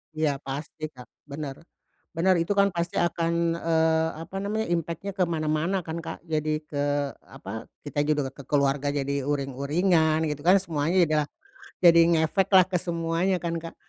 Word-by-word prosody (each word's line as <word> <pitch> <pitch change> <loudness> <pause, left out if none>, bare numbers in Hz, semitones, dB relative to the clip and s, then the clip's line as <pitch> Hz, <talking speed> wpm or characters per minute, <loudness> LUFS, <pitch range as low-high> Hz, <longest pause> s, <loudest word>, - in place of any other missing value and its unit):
Iya, 150 -3 0
pasti, 150 +3 -5
Kak, 125 -4 -14 0.2
benar, 140 -1 -6 0.6
benar 185 +3 +3
itu 170 +4 0
kan 200 0 +5
pasti 170 0 -2
akan, 170 -1 0 0.3
eee, 160 -1 +2
apa 195 - -12
namanya 215 +3 -2
impact-nya 170 +3 -2
ke 185 - +3
mana-mana 165 +3 0
kan 160 0 -5
Kak 165 - -7
jadi 155 -1 -1
ke 145 -1 -3 0.4
apa 110 -5 -8 0.2
kita 145 0 -4
juga 145 -3 0
ke 140 - -12
keluarga 140 0 +1
jadi 140 0 -1
uring-uringan 155 +4 +1
gitu 145 -1 -5
kan 190 +2 +7
semuanya 165 0 -1
juga, 155 -2 +2 0.6
jadi 170 -1 +8
ngefeklah 185 +3 +4
ke 185 -1 0
semuanya 170 +2 0
kan 170 -1 -2
Kak. 165 0 -8
160 Hz, 155 wpm, -26 LUFS, 145-170 Hz, 0.6 s, jadi